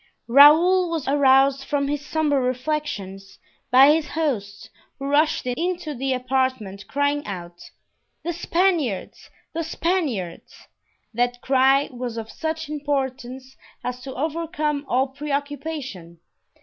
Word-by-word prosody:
Raoul 320 +8 +6
was 325 -4 -3
aroused 275 -1 +4
from 280 -1 -1
his 290 0 -2
sombre 295 -2 0
reflections 250 -7 -3 0.3
by 265 +3 +7
his 315 -1 -1
host, 225 -11 -3 0.3
who 275 - -6
rushed 300 +2 +2
into 335 +5 -2
the 270 +1 -2
apartment 255 -6 -1
crying 285 +1 0
out, 175 -3 -8 0.5
"The 345 - -2
Spaniards! 335 - -1 0.2
the 330 0 -2
Spaniards!" 310 - -3 0.5
That 245 +1 0
cry 270 +1 +3
was 245 -2 -5
of 225 -1 -6
such 320 0 -4
importance 265 -3 -4 0.3
as 250 0 -4
to 265 +1 -8
overcome 305 0 -2
all 260 +2 +2
preoccupation. 280 - -5
275 Hz, 115 wpm, -23 LUFS, 250-305 Hz, 0.5 s, by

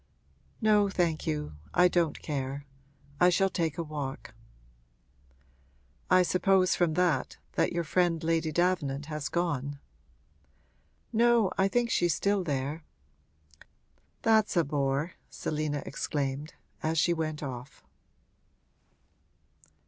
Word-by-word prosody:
'No, 210 -2 +4
thank 170 -4 0
you, 75 0 -3 0.2
I 180 - +6
don't 170 -4 0
care 140 -1 -3 0.5
I 180 - +6
shall 190 +2 +2
take 165 -5 -1
a 170 - -1
walk.' 145 -6 -6 1.8
'I 185 0 +6
suppose, 185 +1 +3
from 170 -3 +1
that, 170 -7 +1
that - - +1
your 170 -1 -1
friend 170 0 +1
Lady 165 -1 +1
Davenant 150 -5 0
has 150 -1 -4
gone.' 145 -5 -1 1.4
'No, 230 -3 +4
I 190 - +3
think 235 +3 0
she 175 - +3
is 165 - +1
still 200 -1 +1
there.' 145 +1 -3 1.4
'That's 220 -4 +3
a 170 - +5
bore!' 140 +3 -1 0.2
Selina 150 -1 -3
exclaimed, 140 +1 -3 0.3
as 160 +1 -1
she 170 +3 +3
went 155 -2 -3
off. 125 -1 -7
160 Hz, 115 wpm, -29 LUFS, 145-180 Hz, 1.8 s, I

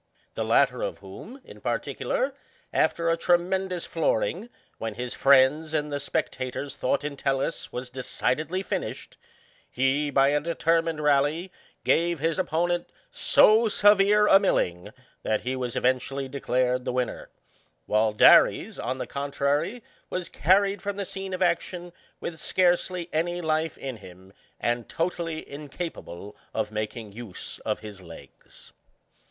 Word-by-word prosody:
The - - -2
latter - - +3
of - - -3
whom, 265 +3 -11
in - - -13
particular, - - -1 0.4
after 165 0 +2
a - - +3
tremendous 180 +1 +1
floorings - - -1 0.3
when 110 -2 -4
his 125 +1 -4
friends 140 +4 +4
and 150 -1 -1
the 145 - -1
spec - - -1
tators 130 +2 -5
thought 140 0 -1
Entellus 140 0 -2
was 125 0 -6
decidedly 150 +7 -2
finished^ - - -5 0.5
he, 135 +3 +1
by 135 -1 +4
a 145 +1 +2
determined 165 -1 0
rally, 150 +5 +2 0.3
gave 170 +1 +2
his 165 +4 -1
opponent 175 0 0 0.2
so 220 +2 +5
severe 205 0 +5
a 195 -2 +7
milling 90 - 0 0.3
that 110 - 0
he 130 +1 -2
was 125 -2 -3
eventually 130 +2 0
declared 130 -2 0
the - - -2
victor; 125 0 -3 0.6
while 110 +1 +2
Daresy 105 - +5
on 130 +2 -2
the - - -4
contrary, 145 - -1 0.3
was 180 -1 -3
carried 195 +3 +2
from 205 0 -3
the 200 - -2
scene 195 0 -6
of 185 0 0
action 175 0 -1 0.3
with 160 -2 -6
scarcely 180 0 +1
any 175 +3 0
life 160 -1 -1
in 130 -3 -6
him, 95 -1 -14 0.3
and 120 0 -1
totally 165 -1 -3
incapable 140 - -7 0.2
of 110 -1 -1
making 110 0 -4
use 110 -3 -8
of - - -3
his 105 -3 -10
legs. 80 -6 -14
150 Hz, 140 wpm, -26 LUFS, 125-175 Hz, 0.6 s, a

